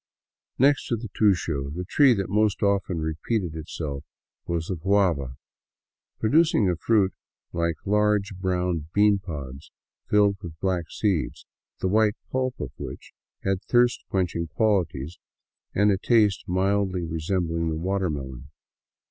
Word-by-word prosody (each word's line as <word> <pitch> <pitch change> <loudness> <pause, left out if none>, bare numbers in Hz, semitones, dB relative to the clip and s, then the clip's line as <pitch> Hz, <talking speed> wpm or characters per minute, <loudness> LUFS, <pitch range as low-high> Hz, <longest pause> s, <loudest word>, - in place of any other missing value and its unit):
Next 140 +2 +3
to 120 - 0
the 115 -1 -7
tusho, 85 -10 +1
the 90 +1 -4
tree 130 +5 +5
that 95 -2 -2
most 105 +1 +1
often 95 -4 +1
repeated 80 +3 -2
itself 75 -3 -5 0.4
was 85 -1 -1
the 95 - -3
guaha, 85 -7 +1 0.8
producing 145 - +3
a 90 - +1
fruit 100 +1 +2 0.4
like 85 -1 0
large 105 -1 +2
brown 90 -4 -1
beanpods 85 -10 0 0.4
filled 100 -1 +4
with 80 -2 -9
black 90 -2 -1
seeds, 100 -7 -1 0.4
the - - +1
white 105 +2 +3 0.2
pulp 130 -1 -1
of - - -4
which - - -8 0.3
had 95 -1 0
thirst 120 +1 +2
quenching 90 -3 -1
qualities 85 -4 0 0.6
and 105 +1 +4
a 95 - +1
taste 105 -3 +3
mildly 95 0 +1
resembling 85 0 -1
the 80 - -2
water 95 +2 -1
melon. 65 -3 -6
95 Hz, 130 wpm, -25 LUFS, 80-105 Hz, 0.8 s, tree